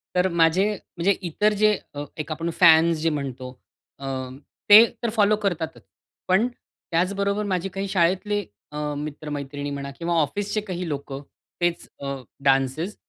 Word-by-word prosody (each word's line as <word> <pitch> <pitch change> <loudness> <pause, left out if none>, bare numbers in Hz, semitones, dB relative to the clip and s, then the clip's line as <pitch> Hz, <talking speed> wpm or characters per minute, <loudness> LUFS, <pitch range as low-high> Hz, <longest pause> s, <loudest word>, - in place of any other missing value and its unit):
तर 180 +1 +3
माझे 170 +3 +3 0.3
म्हणजे 180 +4 +3 0.2
इतर 210 +6 +2
जे 210 +1 +4 0.2
अ, 145 - -3
एक 155 +1 -5
आपण 165 +2 -2
फॅन्स 165 -1 +6
जे 165 - +2
म्हणतो 130 -3 -5 0.4
अ, 135 - -7 0.6
ते 215 +3 +11 0.2
तर 235 - +1
फॉलो 215 -1 +3
करतातच. 175 -6 -3 0.4
पण 190 +6 +3
त्याचबरोबर 200 -2 -2
माझे 190 -1 -1
काही 195 +1 -4
शाळेतले 190 +3 +1 0.3
अ, 150 - -7 0.2
मित्र-मैत्रिणी 145 -1 -5
म्हणा 140 0 -5
किंवा 170 +1 -1
ऑफिसचे 205 +7 -2
काही 180 -4 -5
लोकं 140 -1 -5 0.4
तेच 175 -1 0
अ, 140 0 -3 0.3
डान्सेज 135 +8 +1
170 Hz, 140 wpm, -24 LUFS, 145-200 Hz, 0.6 s, ते